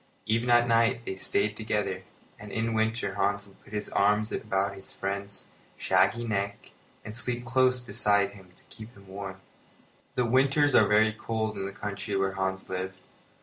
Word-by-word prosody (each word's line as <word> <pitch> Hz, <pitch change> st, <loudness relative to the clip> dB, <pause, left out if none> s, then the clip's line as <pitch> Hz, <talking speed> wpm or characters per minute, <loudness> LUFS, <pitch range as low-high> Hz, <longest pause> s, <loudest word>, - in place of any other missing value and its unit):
Even 115 Hz, +3 st, +1 dB
at 120 Hz, 0 st, +5 dB
night 115 Hz, 0 st, +3 dB
they 95 Hz, -, -3 dB
stayed 105 Hz, +2 st, 0 dB
together; 105 Hz, -4 st, -1 dB, 0.4 s
and 105 Hz, -1 st, -9 dB
in 115 Hz, -, -1 dB
the 115 Hz, -, -1 dB
winter 110 Hz, -2 st, 0 dB
Hans 100 Hz, +1 st, 0 dB
would 100 Hz, -1 st, -20 dB
put -, -, -17 dB
his 105 Hz, -1 st, -2 dB
arms 105 Hz, +2 st, +2 dB
about 100 Hz, -2 st, -1 dB
his 95 Hz, -1 st, -9 dB
friend's 100 Hz, 0 st, -4 dB, 0.3 s
shaggy 120 Hz, -, +3 dB
neck 100 Hz, -2 st, -3 dB, 0.3 s
and 105 Hz, 0 st, -6 dB
sleep 120 Hz, 0 st, -2 dB
close 125 Hz, +1 st, +3 dB
beside 100 Hz, -4 st, +1 dB
him 95 Hz, -2 st, -15 dB
to -, -, -18 dB
keep 110 Hz, 0 st, -11 dB
warm. 95 Hz, -1 st, -8 dB, 0.7 s
The 125 Hz, -, +2 dB
winters 135 Hz, +4 st, +3 dB
are 110 Hz, -, +6 dB
very 110 Hz, +1 st, +4 dB
cold 110 Hz, 0 st, -2 dB
in 95 Hz, -, -3 dB
the -, -, -5 dB
country 100 Hz, 0 st, -4 dB
where 95 Hz, 0 st, +1 dB
Hans 95 Hz, 0 st, -2 dB
lived. 95 Hz, 0 st, -4 dB
105 Hz, 175 wpm, -28 LUFS, 100-115 Hz, 0.7 s, are